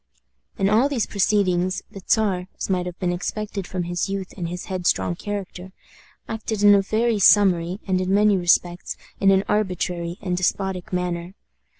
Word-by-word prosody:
In 195 - +2
all 225 +7 +3
these 255 -6 0
proceedings, 185 -2 +1
the 195 - -9
Czar, 190 -5 +1
as - - -3
might 180 -1 0
have 180 0 -7
been 180 -2 -1
expected 200 +1 -4
from 185 -1 -3
his 175 +3 -2
youth 195 -1 -4
and 175 -3 -4
his 180 +1 -6
headstrong 175 - 0
character, 190 - -6 0.5
acted 220 -1 -3
in 205 0 +8
a 200 - +5
very 220 +2 0
summary, 185 -2 +4
and 185 -1 0
in 185 0 -1
many 205 +1 +4
respects 175 0 +1 0.2
in 195 - +4
an 195 0 +4
arbitrary 180 -4 -1
and 180 -3 -2
despotic 185 0 -1
manner. 180 0 -3
190 Hz, 170 wpm, -23 LUFS, 180-205 Hz, 0.5 s, in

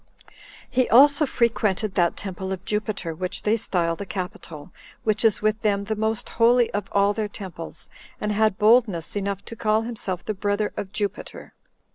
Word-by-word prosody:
He 255 0 +1
also 285 +4 +6
frequented 215 -5 0
that 175 -2 +1
temple 190 -1 -5
of 190 0 -5
Jupiter 210 -5 -2
which 180 +3 -4
they 215 +1 +3
style 175 -6 0
the 200 - -6
Capitol, 180 -5 -7 0.3
which 215 0 0
is 220 -2 +2
with 215 +1 +1
them 200 -2 +1
the 215 +2 -2
most 220 0 -1
holy 240 +1 +3
of 205 -1 -3
all 200 +1 +3
their 215 0 -2
temples, 185 -5 -8 0.3
and 210 - -1
had 215 -1 +2
boldness 210 -7 +3
enough 200 -1 -3
to 230 - -8
call 215 0 +1
himself 205 -6 -4
the 215 - -1
brother 205 +1 -1
of 190 - -5
Jupiter. 205 -2 -5
210 Hz, 170 wpm, -24 LUFS, 190-220 Hz, 0.3 s, also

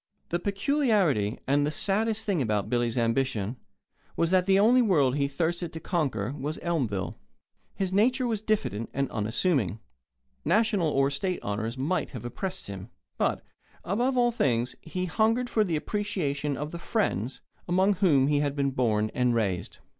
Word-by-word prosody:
The 170 - 0
peculiarity 200 - +1
and 145 +2 +2
the 145 - +1
saddest 215 +7 0
thing 190 -7 +1
about 105 -3 -1
Billy's 120 -1 0
ambition 115 -2 0 0.6
was 165 +1 +1
that 185 0 +3
the 195 0 +5
only 235 +5 +5
world 150 - +3
he 140 -1 +1
thirsted 170 +4 -2
to 160 - -5
conquer 135 - -1
was 150 +3 -4
Elmville. 130 - -1 0.6
His 190 -1 -2
nature 250 +6 +3
was 225 -4 -1
diffident 210 - -1
and 140 -1 -1
unassuming. 110 - 0 0.6
National 210 -7 +2
or 135 -1 +2
State 180 +5 -1
honours 110 +4 -3
might 155 +8 -1
have 115 - -9
oppressed 185 +10 -4
him. 100 +1 -8 0.3
But, - - 0 0.4
above 245 +8 0
all 240 -1 +4
things, 125 - 0
he 180 +3 -3
hungered 225 +7 +1
for 215 - +3
the 175 -5 -1
appreciation 150 -7 -2
of 150 +1 -4
the 170 - -6
friends 135 - -1 0.3
among 190 +3 +3
whom 150 -8 +4
he 145 +1 +2
had 145 -1 0
been 140 -1 +1
born 110 -5 +1
and 125 -1 +2
raised. 100 -6 -1
150 Hz, 160 wpm, -27 LUFS, 125-195 Hz, 0.6 s, the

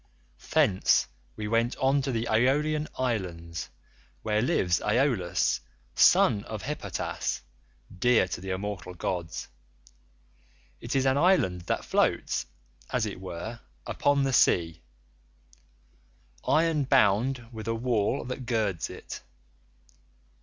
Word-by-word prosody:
"Thence 95 -2 +3 0.3
we 105 - -4
went 115 +2 +1
on 135 +1 +2
to 135 0 -2
the 115 -1 -1
Aeolian 150 +7 +2
island 85 -9 -3 0.6
where 105 0 +1
lives 90 -7 +1
Aeolus 105 -7 +1 0.3
son 100 - +5
of 110 -2 -6
Hippotas, 100 - -3 0.6
dear 120 -3 +4
to - - -5
the 95 - -6
immortal 95 -1 -4
gods. 85 -2 -4 1.3
It 120 +3 -4
is 135 -1 +2
an 135 +1 +3
island 145 - +3
that - - -1
floats - - +1 0.4
(as 125 -3 0
it 100 -3 -5
were) 95 +6 -6 0.3
upon 145 -1 +1
the 135 -1 0
sea,83 85 -8 +3 1.7
iron 160 -1 +3
bound 120 +3 +3
with 110 -1 -8
a 115 - 0
wall 115 +1 0
that 125 0 -6
girds 105 -8 0
it. - - -8
115 Hz, 115 wpm, -28 LUFS, 95-130 Hz, 1.7 s, son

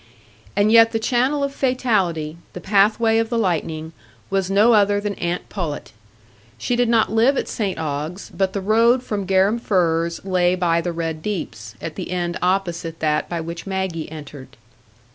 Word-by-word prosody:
And 205 +2 +3
yet 225 0 +6
the - - +2
channel 260 +5 +1
of 280 0 -2
fatality—the 185 - -1
pathway 215 +4 +3
of 225 0 -1
the 235 - -1
lightning—was 170 +1 -3
no 210 +4 +5
other 205 -1 +4
than 205 0 -3
aunt 175 -1 -3
Pullet. 165 -7 -5 0.7
She 240 - -1
did 240 -1 +2
not 230 -3 +3
live 235 +5 +3
at - - -1
St 205 -5 -2
Ogg's, 155 +4 -4
but 190 -1 0
the 200 - -2
road 230 +5 +3
from 200 -5 -3
Garum 195 +4 +3
Firs 170 -5 0
lay 180 -1 +2
by 170 -2 +1
the 175 - -2
Red 165 -2 -4
Deeps, 115 - -5
at 160 - -5
the 185 - -5
end 175 -1 -2
opposite 175 -3 -1
that 150 -1 0
by 170 -1 -3
which 170 +3 -7
Maggie 190 -5 -3
entered. 140 -4 -10
190 Hz, 165 wpm, -21 LUFS, 165-220 Hz, 0.7 s, yet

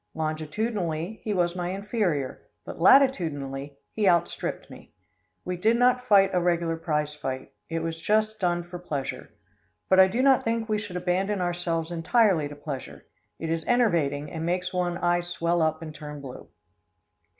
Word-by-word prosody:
Longitudinally 160 +4 -2
he 215 - -2
was 175 -3 +1
my 175 -1 -2
inferior, 190 - -2 0.2
but - - -8
latitudinally 145 - +3 0.2
he 210 -3 +3
outstripped 170 -1 0
me. - - -14 0.5
We 180 0 -3
did 220 +6 +3
not 250 +1 +3
fight 195 -3 +6
a 180 - +2
regular 170 -1 +1
prize 150 -2 -1
fight. 130 -3 -5 0.2
It 165 0 -2
was 165 0 -4
just 215 +2 +1
done 175 -2 0
for 175 +1 -8
pleasure. 145 -6 -5 0.6
But 190 - +5
I 190 - +9
do 235 +7 0
not 270 -2 +5
think 230 -1 -1
we 215 -1 0
should 205 -4 -7
abandon 185 +3 0
ourselves 175 -2 -1
entirely 175 -1 +2
to 145 - -9
pleasure. 145 -2 -7 0.3
It 165 0 -4
is 165 -1 -1
enervating, 160 - +1
and 160 -1 -4
makes 180 +2 -1
one 175 -1 -1
eye 175 0 +1
swell 175 -1 -1
up 160 0 0
and 155 -1 -7
turn 150 -1 -8
blue. 135 -3 -9
175 Hz, 165 wpm, -26 LUFS, 160-200 Hz, 0.6 s, I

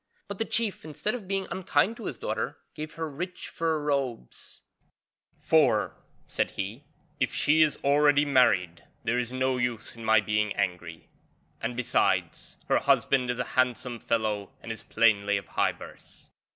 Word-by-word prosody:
But 200 -1 -6
the 225 - +1
chief, 225 -4 -1
instead 160 +7 -2
of 230 -6 -6
being 195 0 0
unkind 190 +3 +1
to - - -8
his - - -4
daughter, - - -3 0.2
gave 155 +1 -7
her 165 -1 -3
rich 180 +5 -6
fur 165 -1 0
robes; 140 - -3 0.8
'for,' - - +3 0.3
said - - -1
he, 105 +9 -4 0.3
'if - - +1
she 155 +2 +4
is 155 -2 +3
already 145 +1 +4
married 95 -11 +3 0.2
there 120 +1 +1
is 120 0 -3
no 130 0 0
use 120 -2 -2
in 115 - -10
my 110 0 +5
being 105 0 0
angry; 90 -4 -3 0.5
and 120 +1 -3
besides, 125 - 0
her - - +3
husband 130 -2 +2
is 125 - -1
a 125 - 0
handsome 125 -1 0
fellow 110 -3 -1
and 115 - -5
is 110 - -6
plainly 100 -3 +2
of 100 - -8
high - - +2
birth.' - - -14
125 Hz, 165 wpm, -27 LUFS, 110-150 Hz, 0.8 s, my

